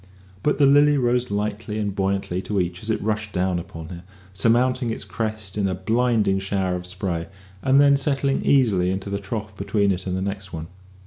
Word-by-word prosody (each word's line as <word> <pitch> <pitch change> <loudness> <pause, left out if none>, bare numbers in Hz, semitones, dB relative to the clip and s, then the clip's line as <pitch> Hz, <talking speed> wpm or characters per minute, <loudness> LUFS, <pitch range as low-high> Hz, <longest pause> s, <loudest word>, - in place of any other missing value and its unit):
But 150 - +1
the 145 - +5
Lily 145 +1 +5
rose 125 -1 +1
lightly 105 +1 -2
and 105 -2 -1
buoyantly 95 -2 -1
to 105 -2 0
each 90 0 -2
as 110 - -6
it 110 - +1
rushed 105 -1 -2
down 90 -1 0
upon 80 -3 -9
her, 85 -1 -8 0.3
surmounting 120 +5 +2
its 115 - -3
crest 110 -3 -4
in 100 - +2
a 95 - -1
blinding 110 0 +1
shower 95 -1 -1
of 90 0 -6
spray, 90 -2 -3 0.3
and 135 +3 +4
then 140 0 +6
settling 140 0 +1
easily 105 -10 +3
into 95 +1 -3
the 100 - -1
trough 105 +1 -5
between 100 0 +1
it 95 0 -3
and 90 0 -1
the - - -2
next 100 -1 -4
one. 80 -1 -5
100 Hz, 200 wpm, -23 LUFS, 95-120 Hz, 0.3 s, then